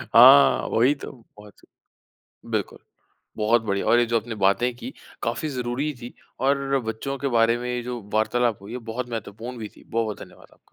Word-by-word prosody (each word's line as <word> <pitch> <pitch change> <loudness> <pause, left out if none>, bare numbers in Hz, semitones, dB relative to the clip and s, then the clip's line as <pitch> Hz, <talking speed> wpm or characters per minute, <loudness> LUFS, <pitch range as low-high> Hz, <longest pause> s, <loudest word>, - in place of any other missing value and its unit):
हाँ, 70 -2 +8
वही 125 +6 +3
तो - - -9
बहुत 105 -4 -17 0.7
सही, - - -20
बिल्कुल। - - -2 0.6
बहुत 110 +2 +2
बढ़िया, 100 -2 -2
और 120 - +5
ये 120 - +3
जो 115 0 +1
आपने 115 +1 -7
बातें 105 +5 +2
कीं - - -7 0.3
काफ़ी 120 +7 -2
ज़रूरी 130 +3 -2
थीं 120 - -8 0.4
और 140 0 +1
बच्चों 125 +5 -3
के 140 - -1
बारे 115 -1 +3
में 125 0 -5
ये 120 - -3
जो 120 -1 -5
वार्तालाप 115 0 +1
हुई 105 +4 -10
हैं 125 -2 -6
बहुत 120 +2 -4
महत्वपूर्ण 115 +2 -6
भी 110 -2 -6
थी। - - -17
बहुत-बहुत 110 -2 -2
धन्यवाद - - -13
आपका। - - -23
120 Hz, 190 wpm, -24 LUFS, 110-125 Hz, 0.7 s, हाँ